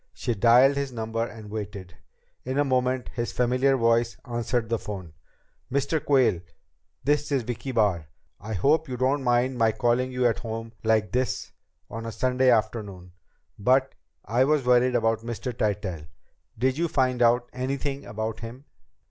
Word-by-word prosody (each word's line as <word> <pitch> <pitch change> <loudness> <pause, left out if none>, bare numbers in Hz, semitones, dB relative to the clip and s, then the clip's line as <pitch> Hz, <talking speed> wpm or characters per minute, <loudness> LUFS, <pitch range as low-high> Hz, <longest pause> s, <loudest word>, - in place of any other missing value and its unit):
She 120 - -2
dialed 120 +6 +5
his 140 -1 -2
number 115 -1 -2
and 110 -3 -8
waited. 100 -5 -6 0.5
In 130 +2 -3
a 145 - +4
moment 130 -1 0
his 120 -1 -3
familiar 130 +2 +2
voice 115 0 +2
answered 120 -1 -1
the 115 0 -1
phone. 95 -6 -7 0.6
"Mr. 140 +3 0
Quayle?... 130 -11 +3 0.6
This 145 +1 +1
is 135 -3 +1
Vicki 120 +3 -4
Barr. 100 - +1 0.3
I 110 +3 -6
hope 150 - +2
you 125 - -4
don't 135 +3 +1
mind 125 +1 +1
my 115 -1 +4
calling 120 +3 +1
you 125 0 0
at 115 -2 +2
home 115 0 -6
like 110 -1 +2
this 125 -1 -1 0.4
on 115 +1 -6
a - - -4
Sunday 130 +4 +2
afternoon, 100 -5 -1 0.5
but 130 +5 +2 0.3
I 120 +5 +2
was 145 -1 +2
worried 125 0 +4
about 115 -1 +2
Mr. 120 +2 -5
Tytell. 100 -8 -2 0.5
Did 130 +5 0
you 170 - +2
find 130 -4 0
out 120 +1 +4
anything 135 +2 -3
about 110 +1 -4
him?" 120 +4 -9
120 Hz, 160 wpm, -26 LUFS, 110-130 Hz, 0.6 s, dialed